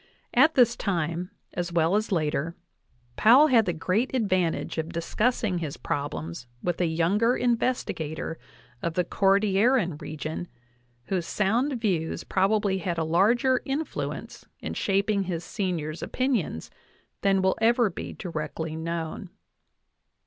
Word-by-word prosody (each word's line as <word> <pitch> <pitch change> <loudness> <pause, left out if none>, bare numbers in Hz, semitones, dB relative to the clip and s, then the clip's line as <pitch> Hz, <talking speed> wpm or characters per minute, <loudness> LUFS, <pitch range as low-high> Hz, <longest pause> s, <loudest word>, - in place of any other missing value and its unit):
At 320 +1 +5
this 240 -2 +5
time, 170 -2 -2 0.2
as 175 0 -3
well 170 +2 +2
as 215 +1 0
later, 160 -1 0 0.6
Powell 265 +8 +7
had 230 -5 +4
the - - +2
great 185 +11 0
advantage 185 -9 0
of 160 +1 -3
discussing 200 +3 0
his 155 -4 -4
prob 145 0 -3
lems 85 +9 -6 0.2
with 175 0 -1
a 175 - +3
younger 195 +9 +2
investigator 175 -11 -1 0.4
of 170 -1 -2
the 180 - +2
Cordilleran 195 - +2
region, 155 +3 -5 0.6
whose 175 +4 -2
sound 235 +6 +1
views 180 -8 -1
probably 195 0 +1
had 175 -3 -2
a 165 - +1
larger 235 +11 +3
influence 285 +4 -4 0.2
in - - -5
shaping 200 +1 +1
his 175 -2 -3
senior's 170 -6 -3
opinions 240 - -1 0.5
than 195 -1 +3
will 190 - +3
ever 230 -2 +4
be - - -6
directly 160 -2 -4
known. 165 +3 -4
185 Hz, 130 wpm, -26 LUFS, 165-220 Hz, 0.6 s, Powell